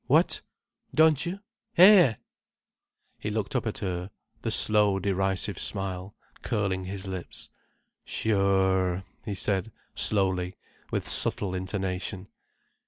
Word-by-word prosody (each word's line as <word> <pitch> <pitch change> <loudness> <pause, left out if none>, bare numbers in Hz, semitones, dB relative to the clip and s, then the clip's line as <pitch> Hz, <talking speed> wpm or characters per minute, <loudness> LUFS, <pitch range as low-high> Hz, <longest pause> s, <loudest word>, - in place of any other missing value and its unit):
What? - - +2 0.5
Don't 155 0 +3
you? 190 +3 -6 0.4
Hé?" 180 - +6 1.0
He 105 - -4
looked 105 +2 -4
up 125 - -1
at 110 - -4
her, 90 -2 -5 0.3
the - - -3
slow, 105 -2 +5
derisive 95 0 -1
smile 95 -1 -4 0.3
curling 100 -5 -2
his 95 +1 -6
lips. 95 -2 -8 0.5
"Sure," 95 -3 0 0.2
he 105 - -4
said 100 +2 -1 0.2
slowly, 95 -3 +3 0.3
with - - -3
subtle 95 -3 +4
intonation. 95 +1 -4
95 Hz, 105 wpm, -26 LUFS, 95-105 Hz, 1.0 s, Hé